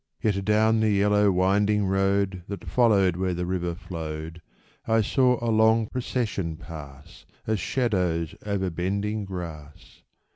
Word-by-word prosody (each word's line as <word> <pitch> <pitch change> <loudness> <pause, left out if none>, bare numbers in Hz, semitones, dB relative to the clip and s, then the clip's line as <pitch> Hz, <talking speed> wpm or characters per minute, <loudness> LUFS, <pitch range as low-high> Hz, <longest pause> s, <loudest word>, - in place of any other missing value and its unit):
Yet 100 -3 0
down 110 +2 +3
the 110 0 +2
yellow, 105 0 +3
winding 100 +3 +2
road 95 0 +1
That 100 0 -7
followed 100 -7 +3
where 95 -1 -1
the 90 +1 -2
river 90 -1 -2
flowed. 80 -1 -7 0.5
I 115 0 +3
saw 125 +3 +2
a 115 - +1
long 110 +1 +4
procession 110 -10 -2
pass 75 -5 -11 0.2
As 110 -1 0
shadows 90 - 0
over 100 -3 -1
bending 100 +5 -2
grass. 80 -6 -9
95 Hz, 135 wpm, -25 LUFS, 90-105 Hz, 0.5 s, long